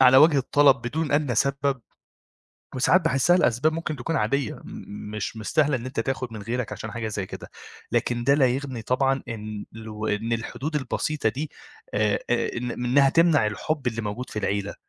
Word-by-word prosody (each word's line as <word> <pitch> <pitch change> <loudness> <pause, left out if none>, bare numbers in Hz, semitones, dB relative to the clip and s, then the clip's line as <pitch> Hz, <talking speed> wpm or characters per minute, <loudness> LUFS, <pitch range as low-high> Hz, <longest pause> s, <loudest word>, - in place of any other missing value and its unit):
على 130 0 +8
وجه 150 +1 +7
الطلب 140 +1 +5
بدون 140 +6 -3
أدنى 145 -4 +2
سبب، 140 +2 +1 0.9
وساعات 140 +8 +4
باحسّها 165 +1 +3
لأسباب 140 0 +2
ممكن 155 -2 -3
تكون 160 +6 -2
عادية 115 +3 0
م - - -13 0.5
مش 105 +1 -4
مستاهلة 140 +6 +1
إن 120 0 -6
أنت 130 -2 -2
تاخد 130 0 -3
من 110 -2 -7
غيرك 120 +1 -3
عشان 110 +1 -6
حاجة 115 -2 -3
زي 100 -3 -3
كده. - - -9 0.4
لكن 120 -1 0
ده 140 - +5
لا 140 -2 +4
يغني 130 -1 -2
طبعًا 135 +3 +1
إن 110 -2 -5
لو 110 -1 -6
إن 110 +2 -1
الحدود 135 +7 -3
البسيطة 145 0 -1
دي 140 +8 -4 0.4
آآ 105 0 +2 0.2
أ 120 - 0
إن 120 +1 -3
إنّها 125 +4 +3
تمنع 160 -6 +4
الحب 130 +7 -2
اللي 115 -2 -1
موجود 105 +5 -5
في 105 - -4
العيلة. 100 0 -1
125 Hz, 180 wpm, -25 LUFS, 110-140 Hz, 0.9 s, على